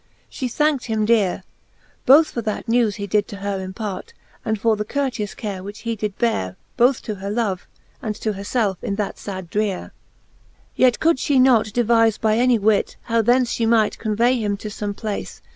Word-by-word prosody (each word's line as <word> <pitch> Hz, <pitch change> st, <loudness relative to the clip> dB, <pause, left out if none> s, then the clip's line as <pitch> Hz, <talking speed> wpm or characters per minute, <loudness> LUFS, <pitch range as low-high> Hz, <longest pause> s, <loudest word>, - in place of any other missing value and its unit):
She 255 Hz, -, -4 dB
thankt 295 Hz, 0 st, +1 dB
him 220 Hz, -2 st, 0 dB
deare, 210 Hz, -5 st, +2 dB, 0.6 s
Both 300 Hz, +5 st, +7 dB
for 235 Hz, -, -3 dB
that 215 Hz, +1 st, -4 dB
newes 230 Hz, -3 st, +2 dB
he 200 Hz, -, -4 dB
did 205 Hz, +1 st, +1 dB
to -, -, -8 dB
her 195 Hz, -1 st, -3 dB
impart, 190 Hz, 0 st, -6 dB, 0.3 s
And 220 Hz, -2 st, -1 dB
for 225 Hz, +1 st, +2 dB
the 210 Hz, -, -2 dB
courteous 240 Hz, -3 st, -3 dB
care, 200 Hz, -4 st, -5 dB
which 205 Hz, +2 st, -9 dB
he 230 Hz, -1 st, -2 dB
did 210 Hz, -2 st, -4 dB
beare 95 Hz, -, 0 dB, 0.2 s
Both 245 Hz, +1 st, +3 dB
to 215 Hz, -, -3 dB
her 200 Hz, -, -4 dB
love, 205 Hz, -4 st, -2 dB, 0.3 s
and 215 Hz, -2 st, -3 dB
to 215 Hz, 0 st, -2 dB
her 195 Hz, -, -7 dB
felfe 205 Hz, -3 st, 0 dB
in 200 Hz, -, -2 dB
that 205 Hz, -1 st, -3 dB
fad 190 Hz, -4 st, -7 dB
dreare. 205 Hz, -3 st, -2 dB
XLVII. -, -, -36 dB
Yet 250 Hz, -2 st, +3 dB
could 330 Hz, -1 st, +3 dB
fhe 270 Hz, 0 st, +2 dB
not 255 Hz, -4 st, +5 dB
devife 225 Hz, 0 st, +2 dB
by 220 Hz, 0 st, +2 dB
any 250 Hz, -1 st, +4 dB
wit, 210 Hz, -1 st, +1 dB
How 230 Hz, -1 st, +1 dB
thence 245 Hz, +2 st, +2 dB
fhe 225 Hz, -, +2 dB
might 220 Hz, -2 st, +2 dB
convay 235 Hz, +3 st, +1 dB
him 205 Hz, -2 st, -1 dB
to 215 Hz, -, -6 dB
fbme 205 Hz, -1 st, -4 dB
place. 215 Hz, -2 st, -5 dB
220 Hz, 200 wpm, -21 LUFS, 205-235 Hz, 0.6 s, Both